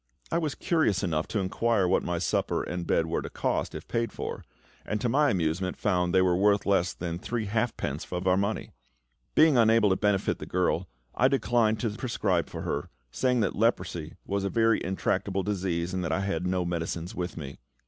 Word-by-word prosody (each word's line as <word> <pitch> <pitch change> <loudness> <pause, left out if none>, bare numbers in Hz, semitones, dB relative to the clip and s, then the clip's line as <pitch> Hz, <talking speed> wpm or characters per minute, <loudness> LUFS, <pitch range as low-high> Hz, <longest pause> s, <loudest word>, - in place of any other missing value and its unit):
I 170 - +2
was 155 -4 -2
curious 155 - +1
enough 80 -4 0
to - - -3
inquire 100 +1 +1
what 90 - +3
my 85 0 -2
supper - - 0
and 90 -1 -4
bed 80 - +2
were 80 - -1
to - - -6
cost, - - -2
if - - -7
paid 115 0 -1
for; - - -5 0.4
and 105 - -2
to 120 - 0
my 145 +5 +3
amusement 90 +1 -1
found 90 -3 +1
they 95 0 +4
were 90 -1 +3
worth 100 +2 +3
less 95 -3 +2
than 85 -1 -5
three 115 +2 -3
halfpence 110 - -2
of 90 0 -3
our 90 -1 +4
money! 100 +3 -1 0.6
Being 155 -5 +6
unable 110 -2 +5
to - - +4
benefit 100 -1 +1
the - - -7
girl, 90 -1 0 0.3
I 130 - +4
declined 120 -5 +2
to 115 - 0
prescribe 105 -6 -1
for - - -6
her, - - -3 0.2
saying 125 - +1
that 100 - 0
leprosy 90 -7 0
was 100 0 -1
a 100 - 0
very 115 0 +2
intractable 95 +1 -1
disease, 90 -3 -1
and 95 -1 -1
that 80 - -2
I 95 - 0
had 90 -3 -1
no 90 -1 0
medicines 85 +2 -3
with 90 -4 -4
me. 70 -3 -7
95 Hz, 200 wpm, -28 LUFS, 90-110 Hz, 0.6 s, Being